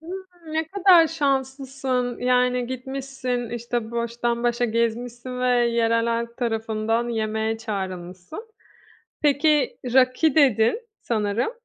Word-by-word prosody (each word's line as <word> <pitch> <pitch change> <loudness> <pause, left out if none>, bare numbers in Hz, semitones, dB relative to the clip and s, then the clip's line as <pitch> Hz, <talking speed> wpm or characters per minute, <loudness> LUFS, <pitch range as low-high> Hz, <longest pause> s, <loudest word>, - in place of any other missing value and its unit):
Hıı, 355 -1 -10
ne 320 0 -1
kadar 370 -4 +6
şanslısın. 265 -4 -1
Yani, 250 0 +2
gitmişsin, 260 -2 -4
işte, 235 -1 -3
baştan 235 0 -2
başa 240 0 +1
gezmişsin 240 +2 -2
ve 250 - +1
yerel 235 -1 +2
halk 235 0 -2
tarafından 225 0 -1
yemeğe 220 -1 -1
çağrılmışsın. 190 - -6 0.7
Peki, 295 0 +2 0.2
"raki" 260 +4 +3
dedin 255 - +4 0.2
sanırım. 220 - -1
245 Hz, 105 wpm, -23 LUFS, 230-270 Hz, 0.7 s, kadar